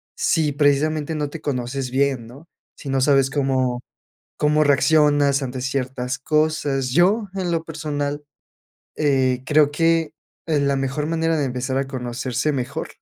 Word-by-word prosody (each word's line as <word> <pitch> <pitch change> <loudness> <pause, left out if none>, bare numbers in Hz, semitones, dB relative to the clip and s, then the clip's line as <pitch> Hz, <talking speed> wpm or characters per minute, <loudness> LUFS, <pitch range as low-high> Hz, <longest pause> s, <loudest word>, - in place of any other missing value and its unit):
si, 155 -2 +1
precisamente 150 +2 +1
no 150 -1 -2
te 160 +2 -8
conoces 130 -1 -3
bien, 135 -3 0
¿no?, 140 +7 -14 0.3
si 140 - -9
no 135 0 +1
sabes 135 -1 +3
cómo 130 -3 0 0.6
cómo 150 +1 +3
reaccionas 145 -1 +3
ante 130 -1 -5
ciertas 130 -1 -3
cosas. 150 -3 0
Yo 195 - +3
en 180 -2 -2
lo 165 -1 -1
personal, 145 -2 -4 0.7
eh, 130 -4 +1
creo 150 -1 +4
que, 165 0 +1 0.3
eh, 155 -3 +1
la 140 0 +1
mejor 135 +2 -2
manera 165 0 0
de 145 - +1
empezar 130 +1 -3
a 135 - -1
conocerse 125 +1 -2
mejor 140 +4 -4
140 Hz, 150 wpm, -22 LUFS, 130-155 Hz, 0.7 s, creo